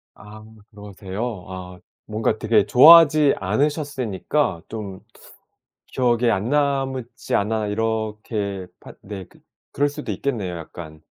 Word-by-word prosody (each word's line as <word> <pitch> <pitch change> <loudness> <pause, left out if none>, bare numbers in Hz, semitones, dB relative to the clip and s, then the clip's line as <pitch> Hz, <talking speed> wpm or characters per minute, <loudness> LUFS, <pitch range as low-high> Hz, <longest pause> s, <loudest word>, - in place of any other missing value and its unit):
아 105 +1 -13 0.3
그러세요. 105 0 -6
아 90 -1 -8 0.3
뭔가 110 0 -1
되게 110 -2 +2
좋아하지 155 +2 +7
않으셨으니까 130 - -1
좀 100 -4 -7 0.9
기억에 120 -2 +1
안 105 +1 -1
남았지 135 -4 -1
않나 110 +1 0
이렇게 105 -2 -3
파 - - -12
네 95 -2 -8
그 - - -22 0.3
그럴 145 +2 +1
수도 145 +1 -7
있겠네요 105 -10 -3
약간. 80 -1 -10
110 Hz, 250 characters per minute, -22 LUFS, 100-130 Hz, 0.9 s, 좋아하지